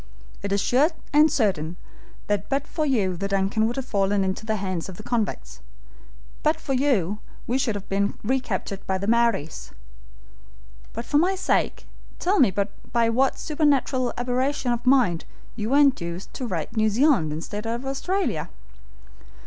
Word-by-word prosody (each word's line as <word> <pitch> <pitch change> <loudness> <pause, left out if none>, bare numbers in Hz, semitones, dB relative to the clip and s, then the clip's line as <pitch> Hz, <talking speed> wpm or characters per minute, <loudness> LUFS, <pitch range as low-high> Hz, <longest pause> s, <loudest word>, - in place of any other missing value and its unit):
It 200 - -4
is 200 - +2
sure 260 +9 +3 0.2
and 305 +1 +6
certain 180 - 0 0.5
that 205 -1 -1
but 275 +1 0
for 310 -2 -2
you 205 -9 +1
the 195 +3 -3
DUNCAN 200 +3 +1
would 235 - -3
have 270 - -3
fallen 200 -2 +1
into 190 +3 -3
the 220 - +1
hands 185 -3 -3
of 185 - -9
the 215 - -9
convicts; 230 -2 -2 0.8
but 310 +1 +2
for 275 - -3
you 220 - +1 0.3
we 255 +3 0
should 245 -6 0
have 200 -1 -6
been 200 +1 0
recaptured 215 -5 -2
by 190 - +1
the 195 - -4
Maories. 230 -9 +1 1.2
But 230 +2 -6
for 290 - +3
my 370 +4 +2
sake 375 - 0 0.3
tell 385 +3 +1
me 255 - +6
by 205 +4 -1
what 260 +3 +2
supernatural 280 -5 +1
aberration 250 +1 0
of 240 +1 -2
mind 240 -11 +3 0.3
you 215 -1 -3
were 275 - +4
induced 190 -11 +1
to 255 - -4
write 175 -2 -4
New 220 -1 +3
Zealand 235 - +3
instead 205 +8 -5
of 235 +3 -3
Australia?" 270 - -1
230 Hz, 165 wpm, -24 LUFS, 195-270 Hz, 1.2 s, and